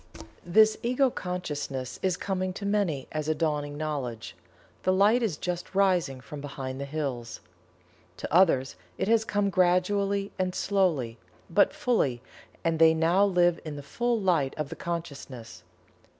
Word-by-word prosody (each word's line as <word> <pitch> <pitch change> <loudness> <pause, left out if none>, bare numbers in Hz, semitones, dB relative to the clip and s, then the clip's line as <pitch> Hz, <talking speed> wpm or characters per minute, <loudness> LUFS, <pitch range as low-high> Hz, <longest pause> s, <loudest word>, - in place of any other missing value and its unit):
This 215 +5 +4
Ego 255 +2 +2
Consciousness 145 - -4
is 185 -2 0
coming 185 -1 -2
to 200 - -6
many 200 -10 0
as 155 0 -3
a 155 - +2
dawning 150 -3 -1
knowledge 130 - -4 0.5
the 185 - +2
light 205 +6 +4
is 205 -10 -1
just 180 +1 -4
rising 180 -9 +2
from 145 +3 -8
behind 135 -2 -6
the - - -3
hills. 135 -6 -4 0.8
To - - -6
others 160 - +4 0.2
it - - -1
has 225 0 +4
come 205 -2 0
gradually 195 +3 +2
and 185 0 -1
slowly, 155 - 0 0.3
but 200 - +4
fully, 140 - 0 0.4
and 165 -1 0
they 160 0 +6
now 170 +5 +3
live 175 -3 +3
in 155 -2 -6
the 145 - -7
full 240 +9 -1
light 170 -9 +1
of 150 -2 -3
the - - -6
consciousness. 140 -8 -6
170 Hz, 150 wpm, -27 LUFS, 145-195 Hz, 0.8 s, they